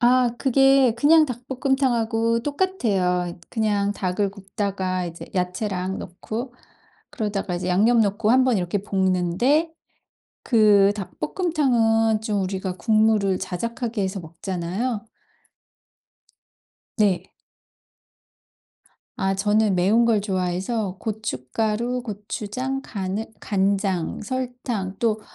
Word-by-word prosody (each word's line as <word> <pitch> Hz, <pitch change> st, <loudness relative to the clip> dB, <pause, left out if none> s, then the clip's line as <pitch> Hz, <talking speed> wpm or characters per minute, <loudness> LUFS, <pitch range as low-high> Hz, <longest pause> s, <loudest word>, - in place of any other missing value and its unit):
아 245 Hz, 0 st, +4 dB
그게 270 Hz, -2 st, +4 dB
그냥 310 Hz, +5 st, +6 dB
닭볶음탕하고 240 Hz, -3 st, 0 dB
똑같아요. 205 Hz, -, 0 dB
그냥 205 Hz, -3 st, 0 dB
닭을 195 Hz, 0 st, -1 dB
굽다가 195 Hz, -2 st, -3 dB
이제 170 Hz, 0 st, -8 dB
야채랑 185 Hz, +1 st, -2 dB
넣고 220 Hz, +7 st, -6 dB, 0.6 s
그러다가 210 Hz, -9 st, -3 dB
이제 180 Hz, +1 st, -3 dB
양념 220 Hz, +6 st, +4 dB
넣고 210 Hz, 0 st, +1 dB
한번 255 Hz, -2 st, +4 dB
이렇게 180 Hz, +2 st, -1 dB
볶는데 195 Hz, -, +1 dB, 0.7 s
그 210 Hz, -4 st, +5 dB
닭볶음탕은 225 Hz, -, +1 dB
좀 210 Hz, -3 st, -1 dB
우리가 190 Hz, -1 st, -3 dB
국물을 215 Hz, -3 st, +2 dB
자작하게 230 Hz, +4 st, -3 dB
해서 190 Hz, 0 st, -2 dB
먹잖아요. 185 Hz, +7 st, -4 dB, 1.9 s
네. 205 Hz, -6 st, +1 dB, 1.9 s
아 195 Hz, 0 st, 0 dB
저는 205 Hz, +1 st, +2 dB
매운 200 Hz, +6 st, +3 dB
걸 225 Hz, -3 st, +3 dB
좋아해서 190 Hz, +1 st, -2 dB
고춧가루, 220 Hz, -, -2 dB
고추장, 220 Hz, +4 st, -4 dB
가느 195 Hz, -1 st, -3 dB, 0.2 s
간장, 195 Hz, -3 st, 0 dB
설탕 245 Hz, -5 st, -4 dB
또 220 Hz, -2 st, +1 dB
210 Hz, 225 characters per minute, -23 LUFS, 190-240 Hz, 1.9 s, 그냥